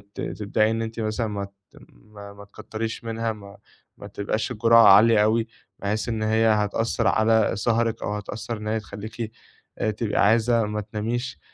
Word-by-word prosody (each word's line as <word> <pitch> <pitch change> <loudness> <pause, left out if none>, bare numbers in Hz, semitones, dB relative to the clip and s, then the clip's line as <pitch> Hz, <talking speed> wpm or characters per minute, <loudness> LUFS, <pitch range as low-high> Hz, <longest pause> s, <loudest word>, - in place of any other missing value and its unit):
ت - - -5
تبدئي 110 +1 0
إن 115 - -2
أنتِ 115 +1 -5
مثلًا 110 +1 -1
ما 100 -2 -4
ت 100 -1 -22 0.2
ما 100 - -13
ما 100 0 -13
تكتّريش 110 +3 -6
منها، 115 0 -2
ما 100 -1 -13 0.4
ما - - -10
تبقاش 110 +3 -3
الجرعة 115 0 +5
عالية 105 +2 +7
أوي، 115 +1 +1 0.3
بحيث 105 +3 -2
إن 110 -1 -2
هي 110 +1 +2
هتأثّر 110 +2 +1
على 110 0 +3
سَهرِك 115 +1 0
أو 105 - -2
هتأثّر 105 +3 -5
إن 105 0 -7
هي 110 +1 0
تخليكِ 110 +2 -7 0.5
آآ، 110 - 0
تبقى 105 -1 0
عايزة 115 +1 +3
ما 105 0 -3
تناميش. 115 +5 -4
110 Hz, 170 wpm, -24 LUFS, 105-115 Hz, 0.5 s, عالية